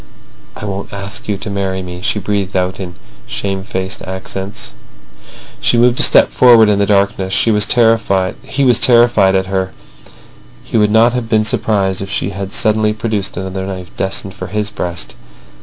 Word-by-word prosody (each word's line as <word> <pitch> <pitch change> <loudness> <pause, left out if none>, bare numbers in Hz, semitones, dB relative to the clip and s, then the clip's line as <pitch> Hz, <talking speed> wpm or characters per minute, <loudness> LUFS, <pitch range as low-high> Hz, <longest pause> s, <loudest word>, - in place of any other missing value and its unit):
"I - - -7
won't 100 -1 -5
ask 100 +1 -6
you 105 -2 -1
to 105 - -7
marry 95 -1 -2
me," 90 0 -8
she 105 - -1
breathed 100 -1 -2
out 90 +1 -1
in 90 -2 -6 0.3
shame 95 -1 -3
faced 95 -3 -4
accents. 95 +1 -6 0.9
She 120 - +1
moved 120 +1 +3
a - - +5
step - - +5
forward 115 -4 +6
in 100 -1 +2
the 100 - +2
darkness. 100 -1 +1
He 115 - +3
was 105 -1 +2
terrified 110 -6 +2 0.2
at 120 -7 +4
her. 95 0 -2 0.9
He - - -2
would 105 -1 +3
not 115 +2 +4
have 125 -2 -3
been 110 -1 +2
surprised 100 -4 0
if 100 - -5
she 100 - -2
had 100 0 -6
suddenly 110 -1 +2
produced 105 -4 -3
another 95 0 -4
knife 95 -2 -7
destined 95 0 -3
for - - -7
his 105 +2 -3
breast. 85 -1 -4
100 Hz, 170 wpm, -15 LUFS, 95-110 Hz, 0.9 s, forward